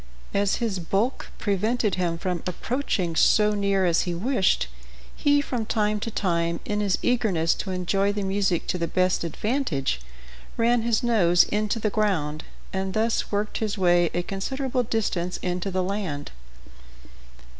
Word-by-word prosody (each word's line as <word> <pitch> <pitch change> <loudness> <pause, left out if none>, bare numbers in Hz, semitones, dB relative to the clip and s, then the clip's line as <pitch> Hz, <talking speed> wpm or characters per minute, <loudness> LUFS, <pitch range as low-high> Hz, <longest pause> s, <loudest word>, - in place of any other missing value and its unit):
As 200 0 +2
his 220 -5 -2
bulk 195 +9 -1
prevented 210 +1 0
him 175 -2 0
from 180 -1 -2
approaching 185 -3 -2
so 210 +5 +4
near 200 -2 +1
as 170 -1 +3
he 175 -1 -2
wished, 195 - +1 0.5
he, 290 0 +3
from 250 -5 -3
time 210 -1 +1
to 230 - -3
time, 170 -5 0
in 210 0 -1
his 200 -3 +1
eagerness 195 -10 +2
to 195 - -4
enjoy 190 +2 +1
the 205 0 -3
music 195 -2 0
to 180 - 0
the 170 - 0
best 185 +1 +1
advantage, 170 - -1 0.6
ran 235 +1 +3
his 230 +1 +1
nose 180 -8 +5
into 210 +2 -1
the 215 -2 -1
ground, 160 -9 0 0.3
and 190 0 -2
thus 225 +1 0
worked 205 +1 -1
his 215 -2 -2
way 175 -2 +4
a 175 - 0
considerable 255 +7 -2
distance 195 -6 -1
into 180 +1 -2
the 185 -1 0
land. 185 -7 -3
195 Hz, 155 wpm, -25 LUFS, 175-220 Hz, 0.6 s, nose